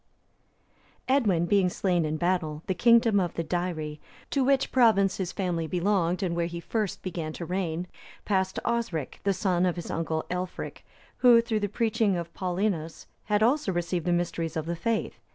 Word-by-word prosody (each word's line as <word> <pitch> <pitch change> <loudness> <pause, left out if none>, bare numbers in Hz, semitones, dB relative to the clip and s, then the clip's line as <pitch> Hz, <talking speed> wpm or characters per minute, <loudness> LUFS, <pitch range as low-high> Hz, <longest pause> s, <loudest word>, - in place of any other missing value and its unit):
D.] 260 - +3
Edwin 200 -11 +3
being 195 -1 +3
slain 175 -2 0
in 155 0 -2
battle, 160 -3 -1
the 190 - 0
kingdom 230 +2 +4
of 175 -3 -1
the 165 - -1
Deiri, 160 -3 -3 0.3
to 275 - +2
which 270 0 +2
province 220 -6 +4
his 185 -2 -2
family 175 -4 -2
belonged, 180 +1 +1
and 170 -2 -1
where 170 0 0
he 170 0 -6
first 210 +3 -3
began 165 -4 -4
to 170 - -6
reign, 180 -1 -2 0.4
passed 190 -2 0
to - - -5
Osric, 230 - -2
the 200 - +4
son 180 -2 +1
of 180 -2 +1
his 175 - -6
uncle 160 -1 -2
Aelfric, 180 0 -5 0.3
who, 245 -2 +7
through 230 -2 0
the 205 -1 -1
preaching 220 -2 +1
of 170 -1 -6
Paulinus, 180 -3 -2 0.2
had 210 0 +2
also 255 -2 +2
received 175 0 -2
the - - +3
mysteries 170 -2 -1
of 155 - -2
the 170 +1 -2
faith. 215 +6 -2
180 Hz, 185 wpm, -27 LUFS, 170-210 Hz, 0.4 s, who